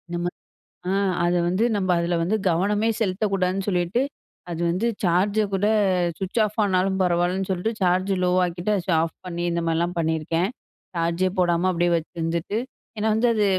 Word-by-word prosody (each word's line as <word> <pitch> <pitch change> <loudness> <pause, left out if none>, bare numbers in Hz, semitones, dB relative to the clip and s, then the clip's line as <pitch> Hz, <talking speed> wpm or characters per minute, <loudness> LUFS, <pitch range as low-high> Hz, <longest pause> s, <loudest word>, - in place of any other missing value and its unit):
நம்ம 175 0 -1 0.6
அ - - +1 0.3
அத 175 0 +2
வந்து 185 +6 +1
நம்ம 190 -2 -1
அதில 170 +1 0
வந்து 195 +6 +1
கவனம் 200 +5 +1 0.2
செலுத்தக்கூடாதுன்னு 195 -1 0
சொல்லிட்டு 180 +5 +1 0.5
அது 170 0 -4
வந்து, 185 +7 0 0.2
சார்ஜ 190 +4 +2
கூட 195 +1 +1 0.5
சுவிட்ச் 190 +4 -2
ஆஃப் 210 0 -2
ஆனாலும் 190 -1 +1
பரவாயில்லன்னு 180 +1 +1
சொல்லிட்டு 190 +4 -1
சார்ஜ் 185 +1 +2
லோ 180 - +3
ஆக்கிட்டு, 175 +3 -2
அத 180 0 -2
ஆஃப் 165 - -3
பண்ணி 175 -1 -4
இந்த 170 0 -1
மாதிரிலாம் 165 +2 0
பண்ணியிருக்கேன். 165 +2 0 0.5
சார்ஜே 170 +2 +1
போடாம 175 0 +2
அப்படியே 175 0 +1
வச்சுருந்துட்டு 165 +4 -3 0.4
ஏன்னா 220 +1 +1
வந்து 230 +3 +2
அது 210 -2 +2
180 Hz, 155 wpm, -24 LUFS, 170-195 Hz, 0.6 s, லோ